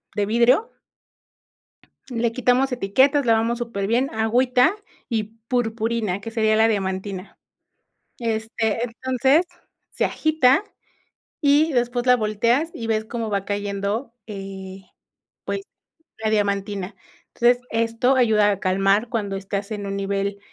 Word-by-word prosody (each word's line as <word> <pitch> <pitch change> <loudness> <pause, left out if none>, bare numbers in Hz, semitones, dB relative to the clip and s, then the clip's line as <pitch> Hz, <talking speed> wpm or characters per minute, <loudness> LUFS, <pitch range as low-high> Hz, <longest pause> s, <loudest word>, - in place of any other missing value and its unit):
de 205 - +1
vidrio 245 - +3 1.4
le 235 -2 0
quitamos 255 +3 +2
etiquetas, 260 +5 +2
lavamos 230 +1 +2
superbién, 235 +3 -1
agüita 250 - +3 0.4
y 225 -3 0 0.3
purpurina, 225 -4 -1
que 225 - -7
sería 220 -1 +2
la 220 +1 +4
diamantina, 190 -1 -3 0.8
este, 225 -1 -1
entonces 260 +6 +1 0.5
se - - -2
agita 310 0 +3 0.8
y 300 +1 +3
después 245 -1 0
la 250 0 +6
volteas 235 +8 +1
y 230 - -5
ves 220 -1 0
cómo 230 -1 -4
va 200 -2 -1
cayendo, 205 +4 -3
eh, 195 -2 -8 0.6
pues, - - -2 0.6
la 215 - +2
diamantina, 200 -2 -1 0.4
entonces, 240 +1 +3
esto 230 +3 +1
ayuda 215 -4 +4
a 200 - -4
calmar 195 +4 +2
cuando 205 -5 -2
estás 200 +1 -4
en 205 -1 -4
un 195 0 -3
nivel 200 0 -2
225 Hz, 120 wpm, -22 LUFS, 200-245 Hz, 1.4 s, la